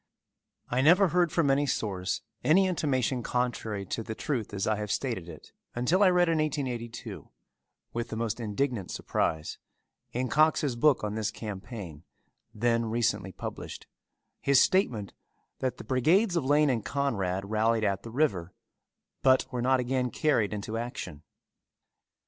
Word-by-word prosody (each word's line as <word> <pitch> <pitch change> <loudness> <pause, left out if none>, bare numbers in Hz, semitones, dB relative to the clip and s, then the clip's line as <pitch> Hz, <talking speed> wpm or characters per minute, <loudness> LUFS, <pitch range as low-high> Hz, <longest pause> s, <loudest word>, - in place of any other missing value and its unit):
I 125 +2 +1
never 180 +6 +6
heard 175 -1 +2
from 150 -5 +2
any 145 +1 +2
source 95 -7 -2 0.2
any 165 +9 +5
intimation 135 -8 0
contrary 115 -5 -2
to 115 - -3
the 110 0 -6
truth 120 -7 -3
as 95 -2 -2
I 110 -1 +1
have 105 -1 -3
stated 110 -11 -2
it 80 - -12 0.2
until 140 +11 +2
I 195 - +7
read 180 -1 +4
in 165 -1 +2
1882, 125 -6 -4 0.6
with 120 0 -3
the - - -4
most 115 0 -2
indignant 115 -1 -2
surprise, 80 -1 -2 0.5
in 125 +2 -1
Cox's 150 0 +3
book 140 +2 +3
on 105 -1 -2
this 110 -1 -1
campaign, 100 - -7 0.5
then 115 +1 +1
recently 110 -4 0
published, - - -7 0.6
his 140 -1 +5
statement 120 - +2 0.5
that 130 -1 -2
the - - -8
brigades 175 - +2
of 165 -6 0
Lane 145 +1 +4
and 115 -4 -1
Conrad 100 -9 -1
rallied 110 +1 +2
at 100 -2 0
the 115 - -9
river 110 - 0 0.7
but 130 -1 +4
were 125 - -2
not 130 +1 +3
again 125 0 0
carried 130 -8 +1
into 105 +1 -4
action. 120 - -6
120 Hz, 150 wpm, -29 LUFS, 105-140 Hz, 0.7 s, I